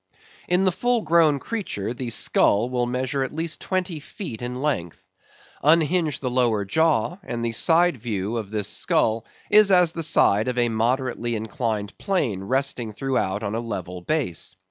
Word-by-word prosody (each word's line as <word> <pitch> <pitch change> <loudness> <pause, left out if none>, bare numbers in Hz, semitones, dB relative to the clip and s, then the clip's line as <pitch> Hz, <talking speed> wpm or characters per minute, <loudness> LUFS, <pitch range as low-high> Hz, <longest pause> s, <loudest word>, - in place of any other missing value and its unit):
In 180 +2 +2
the 185 - +4
full 245 +5 0
grown 160 -5 +3
creature 135 - -4
the 125 -1 -5
skull 115 +1 +2
will 125 -1 0
measure 130 +2 -2
at - - -4
least 165 +1 -4
twenty 185 -4 -2
feet 145 - -8
in 125 +1 -4
length. 130 - -3 0.6
Unhinge 155 0 +2
the 130 - -1
lower 120 -5 +1
jaw, 160 - +1
and 120 -10 -4
the 115 - -1
side 165 +6 +3
view 110 -2 -3
of 110 -4 -5
this 105 -2 -2
skull 115 +1 +1 0.2
is 210 -1 +7
as 180 -3 +5
the 170 - -4
side 110 -8 +3
of 125 -1 -2
a 120 -1 +2
moderately 120 +1 -1
inclined 110 -3 -3
plane 135 - -1
resting 130 -1 -1
throughout 110 -5 -1
on 100 0 -3
a 115 - -1
level 90 -6 -5
base. 125 - -2
125 Hz, 165 wpm, -23 LUFS, 110-160 Hz, 0.6 s, is